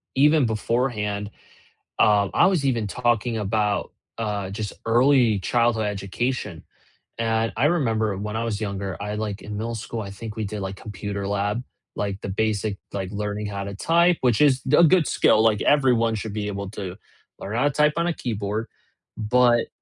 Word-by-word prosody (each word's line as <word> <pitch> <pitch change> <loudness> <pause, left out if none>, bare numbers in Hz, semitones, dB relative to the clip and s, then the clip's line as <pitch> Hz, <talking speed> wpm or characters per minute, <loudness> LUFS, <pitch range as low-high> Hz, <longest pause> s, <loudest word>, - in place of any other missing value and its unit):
even 150 0 +5
beforehand, 105 -2 -1 0.7
um, 100 -2 +4
I - - +5
was 175 -8 +1
even 115 -6 +1
talking 120 0 0
about, 105 -1 0 0.3
uh, 105 -4 -2
just 105 0 -5
early 120 -2 +4
childhood 115 +2 +1
education, 105 -1 -3 0.5
and, 115 -2 0
I 125 - +1
remember 110 - +1
when 105 +1 -4
I 115 - -1
was 110 -2 -2
younger, 100 -4 -4
I 105 +1 -3
like, 105 -2 -3
in 105 -1 -7
middle 115 +2 -3
school, 110 0 -5
I 100 - -7
think 105 +2 -8
we 110 - -2
did, 105 +1 -5
like, 95 0 -4
computer 100 -1 -5
lab, 105 +4 -1 0.3
like, 100 -1 -3
the - - -6
basic, 105 0 -1 0.2
like, 95 -2 -4
learning 105 0 -3
how 100 -1 -4
to 100 0 -6
type, 170 - +3
which 125 +1 +2
is 135 -3 +4
the 150 +5 +5
a - - +8
good 165 -1 +4
skill, 110 - +4
like, 110 -2 +3
everyone 120 -6 +3
should 105 0 -5
be 105 -1 -2
able 100 -1 -4
to 95 -3 -6 0.4
learn 105 +4 -5
how 120 - +2
to 145 - +3
type 150 +1 +2
on 170 +1 +1
a 175 - +1
keyboard, 110 -4 -3 0.5
but 120 +2 +3
110 Hz, 180 wpm, -24 LUFS, 100-120 Hz, 0.7 s, a